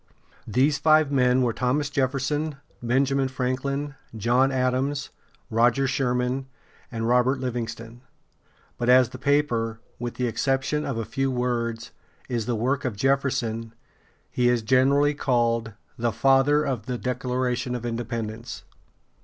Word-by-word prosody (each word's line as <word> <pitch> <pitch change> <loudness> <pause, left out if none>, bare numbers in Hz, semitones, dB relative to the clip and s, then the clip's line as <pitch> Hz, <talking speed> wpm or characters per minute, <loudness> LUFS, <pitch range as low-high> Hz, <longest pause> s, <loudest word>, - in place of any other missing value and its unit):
These 135 +6 +2
five 155 -1 +4
men 125 -1 +3
were 120 -2 +1
Thomas 130 +5 0
Jef´fer 135 -2 0
son, 150 +3 -2 0.3
Benjamin 135 +3 +1
Franklin, 135 +3 -2 0.2
John 125 +5 +2
Adams, 130 +2 -1 0.4
Roger 120 +4 +3
Sherman, 130 0 0 0.4
and 115 -1 -2
Robert 125 +2 +3
Liv´ing 120 -3 -3
ston; 115 +1 -10 0.8
but 120 - 0
as 125 -1 +6
the 130 - -10
paper, 120 -5 +1 0.2
with 120 0 -4
the 125 - -1
exception 135 +5 0
of 135 - -2
a 115 - -2
few 135 +4 -1
words, 120 -2 -2 0.4
is 115 -2 -2
the 120 - 0
work 130 +5 0
of 120 -6 -3
Jefferson, 115 -3 0 0.6
he 120 -1 +2
is 120 -2 +1
generally 135 +4 +3
called 115 -5 0 0.3
the 120 0 +1
"Father 135 +5 +3
of 135 -5 -3
the 125 -1 -2
Declaration 125 0 -2
of 120 -1 -5
Independence." 115 -1 -4
125 Hz, 135 wpm, -25 LUFS, 120-135 Hz, 0.8 s, as